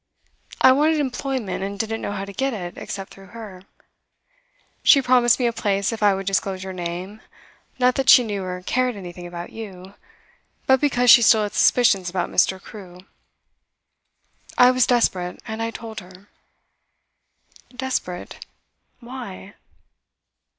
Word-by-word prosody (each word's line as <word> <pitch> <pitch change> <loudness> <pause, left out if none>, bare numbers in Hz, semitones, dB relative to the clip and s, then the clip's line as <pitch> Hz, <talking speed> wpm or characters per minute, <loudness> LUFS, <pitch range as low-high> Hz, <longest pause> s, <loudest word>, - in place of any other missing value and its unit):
I 260 - +7
wanted 305 +4 +2
employment, 260 -7 -3
and 200 +1 -5
didn't 225 +1 -3
know - - -4
how 195 -1 -4
to 200 - -10
get 265 +2 -2
it, 175 -4 -7
except 195 -1 -7
through 195 +2 -16
her. 200 -5 -10 1.2
She 280 - +6
promised 250 -2 +3
me 250 - -1
a 235 - +1
place 200 -2 -1
if 225 - -7
I 205 -2 +4
would 195 0 -5
disclose 190 0 -1
your 190 0 -6
name; 180 +4 -6 0.6
not 250 0 +3
that 270 0 -1
she 250 - +8
knew 205 -3 -4
or 180 0 -6
cared 255 -2 0
anything 175 -2 -9
about 175 0 -8
you, 195 -4 -10 0.7
but 265 -1 +3
because 250 -4 +4
she 235 - +8
still 220 -1 +5
had 205 - -4
suspicions 195 -7 +3
about 175 -1 -3
Mr. 190 +1 +2
Crewe. 185 -3 -12 1.6
I 250 0 +7
was 255 -1 +2
desperate, 185 -7 0
and 220 -1 -6
I 225 - -1
told 225 -1 -8
her.' 185 +1 -16 1.4
'Desperate? 250 -9 -5 0.6
Why? 235 -6 -9
210 Hz, 150 wpm, -22 LUFS, 185-245 Hz, 1.6 s, she